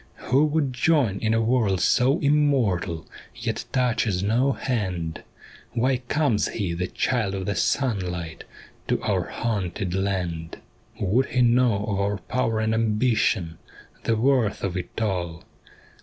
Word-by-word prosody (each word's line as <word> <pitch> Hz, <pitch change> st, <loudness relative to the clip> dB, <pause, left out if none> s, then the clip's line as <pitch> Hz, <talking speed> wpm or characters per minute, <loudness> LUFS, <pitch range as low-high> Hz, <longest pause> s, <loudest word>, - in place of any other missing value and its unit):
' -, -, -33 dB, 0.2 s
Who 140 Hz, +4 st, +5 dB
would 150 Hz, -3 st, 0 dB
join 125 Hz, -6 st, +2 dB
in 110 Hz, 0 st, +1 dB
a 115 Hz, -, +2 dB
world 110 Hz, -5 st, +2 dB
so 125 Hz, -, +3 dB
immortal 130 Hz, -, +1 dB, 0.3 s
Yet -, -, -3 dB
touches 115 Hz, -7 st, +1 dB
no 120 Hz, +7 st, +2 dB
hand, 95 Hz, -12 st, -3 dB, 0.5 s
Why 130 Hz, +2 st, +2 dB
comes 125 Hz, -2 st, +1 dB
he, 95 Hz, -6 st, -2 dB
the 90 Hz, +1 st, -2 dB
child 110 Hz, -5 st, -1 dB
of 95 Hz, -1 st, -3 dB
the 100 Hz, -, 0 dB
sunlight, 90 Hz, -, -1 dB, 0.4 s
To -, -, +1 dB
our -, -, 0 dB
haunted 100 Hz, -5 st, -2 dB
land? 90 Hz, -4 st, -2 dB, 0.2 s
* -, -, -29 dB
Would 110 Hz, +7 st, +2 dB
he 125 Hz, -, +2 dB
know 120 Hz, -4 st, +3 dB
of 100 Hz, -2 st, -1 dB
our 100 Hz, +1 st, 0 dB
power 115 Hz, +2 st, -1 dB
and 110 Hz, 0 st, +1 dB
ambition, 110 Hz, -6 st, +1 dB, 0.5 s
The 115 Hz, -, +2 dB
worth 125 Hz, -3 st, +2 dB
of 95 Hz, -2 st, -2 dB
it 90 Hz, +2 st, -5 dB
all 90 Hz, -6 st, -2 dB
110 Hz, 145 wpm, -24 LUFS, 95-125 Hz, 0.5 s, Who